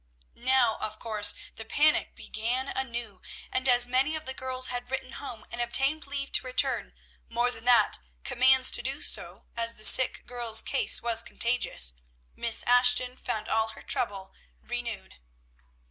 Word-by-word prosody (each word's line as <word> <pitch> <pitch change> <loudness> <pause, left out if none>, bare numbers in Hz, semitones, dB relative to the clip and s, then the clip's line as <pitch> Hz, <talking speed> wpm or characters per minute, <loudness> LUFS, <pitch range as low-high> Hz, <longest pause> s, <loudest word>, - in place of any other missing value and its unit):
Now, 245 -2 +1
of 215 0 -6
course, 215 -2 +2 0.2
the 225 - -6
panic 300 +7 +1
began 245 +5 -2
anew; 235 -7 -5 0.3
and 260 +1 -1
as 245 0 +6
many 260 +5 +1
of 310 0 -7
the 265 - -4
girls 260 -1 -4
had 245 0 -4
written 265 0 -5
home 235 -3 -8
and 240 - -3
obtained 275 +5 0
leave 275 0 -2
to - - +1
return, 250 - -1 0.3
more 240 +1 0
than 225 -1 -8
that, 245 -1 +4 0.2
commands 260 +1 +4
to - - -1
do 270 +4 -3
so, - - -1
as 230 0 -1
the 215 - -8
sick 260 - +4
girl's 240 -2 0
case 270 - +1
was 230 -1 +1
contagious, 235 - 0 0.4
Miss 235 -1 +3
Ashton 245 0 +3
found 220 -4 -5
all 220 0 +1
her - - -14
trouble 195 -4 -2 0.3
renewed. 240 - -7
245 Hz, 160 wpm, -27 LUFS, 230-260 Hz, 0.4 s, as